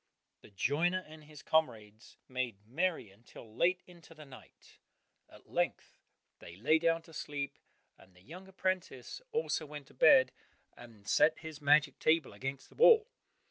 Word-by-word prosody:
The - - -16
joiner 160 - 0
and 155 0 -14
his 150 -1 -14
comrades 110 -9 -1
made 125 -6 -4
merry 150 - -2
until 110 +1 -15
late 180 +5 +1
into 170 -2 -16
the 155 -1 -12
night; 130 -2 -17 0.5
at - - -18
length - - -2 0.4
they 85 - -12
lay 150 - +2
down 165 0 +1
to 165 - -17
sleep, 140 -2 -5 0.4
and 95 -1 -20
the 90 - -20
young 180 - -11
apprentice 185 - -4
also 455 - -2
went 145 -1 -9
to - - -19
bed, 265 -3 +6 0.4
and 115 -4 -15
set 155 +2 +3
his 160 -2 -9
magic 145 0 +3
table 155 -7 +2
against 135 +5 -6
the - - -20
wall. 455 -1 +6
150 Hz, 155 wpm, -32 LUFS, 120-170 Hz, 0.5 s, bed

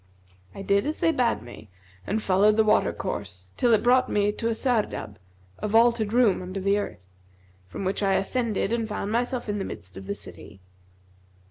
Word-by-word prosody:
I 195 - -7
did 200 +5 +2
as 305 - -3
they 330 - +3
bade 245 - 0
me, 120 -3 -12 0.4
and 215 +2 -1
followed 205 +3 +3
the 220 - +5
water 215 - +3
course, 90 0 -6
till 240 - +2
it 220 - +4
brought 255 +1 +4
me 205 0 +2
to 225 +2 -3
a 230 - 0
Sardab, 220 - -1 0.4
a - - -2
vaulted 225 0 +3
room 235 -6 +3
under 185 +2 -5
the 200 +2 +2
earth, 95 - -6 0.6
from 185 - -6
which 190 +2 -1
I 195 -1 +2
ascended 225 -1 -1
and 230 -2 -1
found 210 0 -3
myself 245 +2 -1
in 205 -1 -2
the - - -2
midst 95 - -8
of 95 0 -9
the 100 - -2
city. 90 +4 -10
210 Hz, 195 wpm, -25 LUFS, 190-235 Hz, 0.6 s, the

